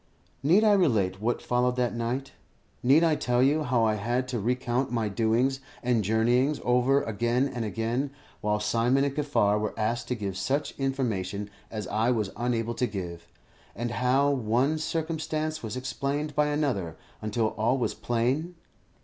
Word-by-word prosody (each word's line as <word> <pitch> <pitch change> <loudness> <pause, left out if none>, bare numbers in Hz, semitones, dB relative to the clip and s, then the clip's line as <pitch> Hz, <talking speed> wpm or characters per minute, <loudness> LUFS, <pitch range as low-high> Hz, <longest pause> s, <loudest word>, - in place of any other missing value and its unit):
Need 175 +10 +4
I 215 - +5
relate 105 - +2
what 120 +2 -1
followed 125 0 +1
that 125 -1 0
night? 120 +4 -3 0.5
Need 140 +6 +5
I 165 -2 +4
tell 135 +4 +2
how 125 -4 +2
I 110 - +2
had 120 +4 -1
to 120 -2 -2
recount 125 +3 0
my 115 -3 0
doings 115 +6 +1 0.2
and 120 -3 +2
journeyings 120 +7 +2
over 125 +3 +3
again 120 +4 0
and 120 -4 -4
again, 115 +5 -1 0.3
while 105 0 +1
Simon 115 +5 +2
and 140 -1 -1
Kaffar 125 -9 +2
were 105 0 -3
asked 115 +2 -1
to 125 - -1
give 100 -4 -4
such 135 +10 -1
information 105 -7 -2 0.2
as 105 -2 -5
I 110 +5 0
was 110 -5 0
unable 120 -1 -1
to 125 - +3
give, 85 -5 -6 0.5
and 120 +2 -3
how 130 +4 +2
one 130 +4 +1
circumstance 155 -1 -2
was 110 +1 -5
explained 140 +3 -2
by 150 +1 +2
another 125 - -1 0.2
until 110 +1 0
all 115 +5 0
was 125 - -1
plain? 130 +9 -1
120 Hz, 160 wpm, -27 LUFS, 110-135 Hz, 0.5 s, I